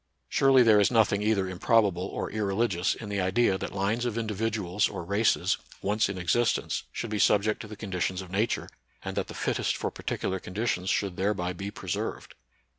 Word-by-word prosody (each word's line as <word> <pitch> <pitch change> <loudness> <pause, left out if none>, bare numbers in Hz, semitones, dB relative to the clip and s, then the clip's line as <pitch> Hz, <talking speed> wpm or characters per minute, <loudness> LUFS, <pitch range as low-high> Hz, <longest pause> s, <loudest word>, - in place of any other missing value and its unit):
Surely 135 -2 +5
there 110 -3 +6
is 100 - +4
nothing 110 -4 +3
either 105 -3 +1
improbable 95 -1 +2
or - - -4
irreligious 100 -3 0
in 110 - -8
the 100 -1 -1
idea 95 +2 +2
that - - -4
lines 100 +5 -1
of 120 -2 -2
individuals 105 -3 0
or - - -6
races, 100 +4 +2 0.3
once 105 +1 +1
in 100 - -4
existence, 100 +7 +1
should 115 - -5
be 105 - -1
subject 105 +1 +3
to 110 - -8
the 105 - -8
conditions 95 -3 -2
of 95 -2 -8
Nature, 105 +4 0 0.4
and - - -4
that - - -1
the - - -9
fittest - - 0
for - - -2
particular 95 0 -3
conditions 95 -1 -2
should 95 -3 0
thereby 95 -2 0
be 95 +3 -5
preserved. 95 -4 -4
100 Hz, 185 wpm, -28 LUFS, 95-110 Hz, 0.4 s, there